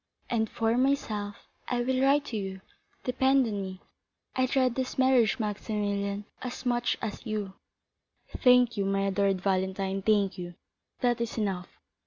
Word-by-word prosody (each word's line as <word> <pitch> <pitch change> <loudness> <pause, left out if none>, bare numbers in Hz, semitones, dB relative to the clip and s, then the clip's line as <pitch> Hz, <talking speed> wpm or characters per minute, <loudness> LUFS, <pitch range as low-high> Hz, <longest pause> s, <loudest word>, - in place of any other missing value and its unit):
"And 220 -2 +1
for 225 +1 +1
myself—I 240 -2 -2
will 260 +1 +1
write 280 +2 +4
to 245 - -5
you, 190 -2 -4 0.4
depend 265 +1 +3
on 205 -3 -2
me. 190 -1 -6 0.5
I 255 0 +2
dread 255 -1 +2
this 260 +1 -3
marriage, 260 -4 +4
Maximilian, 205 -2 -2 0.2
as 250 0 -6
much 240 -1 +1
as 215 -2 -4
you." 210 -4 -3 0.8
"Thank 250 -2 +5
you, 200 - +1
my 195 0 +1
adored 195 -1 +1
Valentine, 190 0 0
thank 200 -2 +2
you; 175 -1 -6 0.5
that 240 -1 +2
is 235 0 -3
enough. 195 -4 -1
215 Hz, 145 wpm, -29 LUFS, 195-250 Hz, 0.8 s, Thank